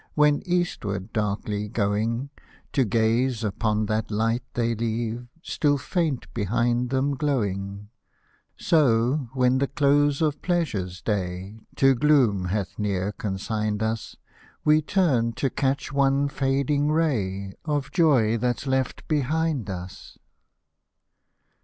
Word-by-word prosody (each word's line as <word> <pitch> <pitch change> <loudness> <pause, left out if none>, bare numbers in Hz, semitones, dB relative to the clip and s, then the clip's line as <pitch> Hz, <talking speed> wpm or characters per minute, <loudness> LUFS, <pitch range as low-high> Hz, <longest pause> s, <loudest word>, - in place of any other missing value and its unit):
When 150 -1 +4
eastward 105 - -2
darkly 105 0 -2
going, 115 +5 -1 0.4
To 135 - +3
^dzc 115 +3 +1
upon 105 +1 0
llial 110 +1 -1
light 115 +3 0
ihcy 115 -2 0
leave 115 +1 -2 0.2
Still 145 -4 +1
faint 155 -2 -1
behind 120 +3 0
them 135 +2 0
glowing, 100 -8 -2 0.3
— - - -39
So, 130 -3 +2
when 130 0 +3
the 140 - +1
close 145 0 +2
of 150 -2 0
pleasure's 105 - -2
day 95 0 -3 0.2
To 135 0 +5
gloom 125 -9 +3
hath 100 +2 -3
near 100 -1 -1
consigned 105 +1 -2
us. 110 0 -3 0.5
We 155 +1 +5
turn 145 -10 +1
to 135 +1 -1
catch 140 +2 -1
one 140 0 +2
fading 140 +1 +1
ray 100 -12 0
Of 145 -3 -2
joy 125 - +3
that's 125 +3 -1
left 130 -1 -1
behind 150 -4 0
us. 90 -1 -8
120 Hz, 120 wpm, -25 LUFS, 105-140 Hz, 0.5 s, To